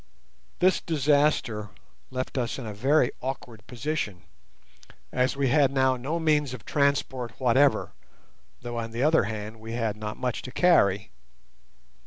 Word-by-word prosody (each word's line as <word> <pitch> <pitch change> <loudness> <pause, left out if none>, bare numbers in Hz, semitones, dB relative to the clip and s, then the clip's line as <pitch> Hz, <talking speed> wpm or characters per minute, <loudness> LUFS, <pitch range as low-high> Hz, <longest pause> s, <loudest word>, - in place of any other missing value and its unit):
This 185 0 +3
disaster 145 -8 +1 0.4
left 130 0 -4
us 125 -3 -1
in 130 - -6
a 105 - -5
very 130 +5 +2
awkward 125 -4 -6
position, 125 - -3 0.9
as 130 +2 0
we 140 -2 +1
had 140 0 +4
now 130 -1 +3
no 135 +7 -3
means 150 -5 +1
of 115 - -13
transport 140 -5 0
whatever, 130 +2 +3 0.7
though 120 -1 -4
on 115 0 -4
the 115 +3 -2
other 155 +2 +4
hand 110 +1 -6
we 115 +1 -7
had 115 -3 -1
not 105 0 -6
much 125 -3 -2
to 125 - -8
carry. 105 - +3
130 Hz, 145 wpm, -26 LUFS, 115-145 Hz, 0.9 s, had